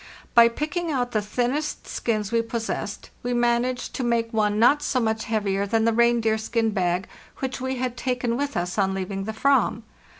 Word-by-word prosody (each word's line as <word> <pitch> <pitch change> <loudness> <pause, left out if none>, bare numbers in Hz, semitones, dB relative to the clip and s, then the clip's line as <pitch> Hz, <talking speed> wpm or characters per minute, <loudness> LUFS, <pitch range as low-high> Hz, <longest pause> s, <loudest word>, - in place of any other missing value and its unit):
By 235 -1 +8
picking 315 +7 -3
out 250 -4 -1
the 215 - +1
thinnest 250 +8 -2
skins 215 -3 -2
we 230 0 +3
possessed, 225 -3 -4
we 245 0 -1
managed 240 +1 0
to 260 - -3
make 230 -1 0
one 210 -1 +1
not 275 +7 +5
so 285 -3 0
much 220 -2 -1
heavier 200 -3 0
than 225 +2 +2
the 230 - +3
reindeer 230 -1 +3
skin 225 0 0
bag 180 -2 0 0.3
which 260 -1 -4
we 260 0 -2
had 250 -1 -2
taken 245 -2 -1
with 285 +2 -2
us 180 +3 -2
on 190 -1 +1
leaving 195 +1 -3
the 220 - -3
/vam. 235 -2 +2
230 Hz, 190 wpm, -24 LUFS, 215-250 Hz, 0.3 s, By